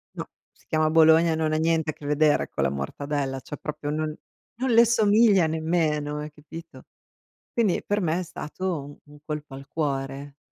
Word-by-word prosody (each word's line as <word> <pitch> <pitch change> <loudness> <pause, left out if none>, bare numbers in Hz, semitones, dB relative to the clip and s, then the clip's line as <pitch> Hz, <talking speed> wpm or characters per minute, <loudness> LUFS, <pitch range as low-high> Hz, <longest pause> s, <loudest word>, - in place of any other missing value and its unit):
No, - - -5 0.2
si - - -29
chiama 155 0 +1
Bologna, 160 +1 +5
non 160 -1 0
ha - - +2
niente 160 0 +1
a - - -14
che 145 - -13
vedere 150 +1 +2
con - - -2
la 70 - +2
mortadella, 135 - -3
cioè. 145 - -8
proprio 150 0 -5
non 155 0 -2 0.4
non 260 +3 -2
le 230 +1 +7
somiglia 215 -5 +4
nemmeno, 155 -2 -1
hai 150 +1 -6
capito? 165 +3 -12 0.7
Quindi 220 -6 +1
per 205 +1 0
me 170 -2 0
è - - -2
stato 155 -3 -5
un 150 0 -16
colpo 150 -2 -6
al 135 +1 -10
cuore. 140 -2 -3
155 Hz, 175 wpm, -25 LUFS, 145-165 Hz, 0.7 s, le